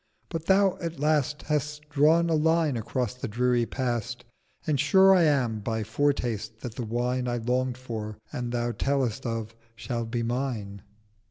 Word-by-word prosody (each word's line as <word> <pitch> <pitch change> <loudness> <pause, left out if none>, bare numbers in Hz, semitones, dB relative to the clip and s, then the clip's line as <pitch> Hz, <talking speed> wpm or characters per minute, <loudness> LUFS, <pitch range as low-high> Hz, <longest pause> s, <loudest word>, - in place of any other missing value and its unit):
But 165 -1 -5
Thou 195 -1 +4
at 170 -4 -4
last 150 -1 +1
Hast 150 0 -2
drawn 155 +3 +4
a 165 - +1
line 160 -2 +2
across 120 +1 -2
the 125 - -5
dreary 120 +1 +1
Past, 120 -1 -3 0.4
And 150 -3 +1
sure 190 +7 +6
I 180 - +5
am 125 -7 +2
by 110 +1 -2
Foretaste 115 -3 -1
that 120 -4 -5
the 120 - -5
Wine 125 +3 -1
I 120 0 0
long'd 125 +2 0
for, 110 -4 -6 0.2
and 120 -1 -3
Thou 120 0 -1
tell'st 135 -1 -1
of, 115 -1 -3 0.2
shall 115 0 -3
be 115 +1 -2
mine.' 115 -5 -3
125 Hz, 165 wpm, -27 LUFS, 115-150 Hz, 0.4 s, sure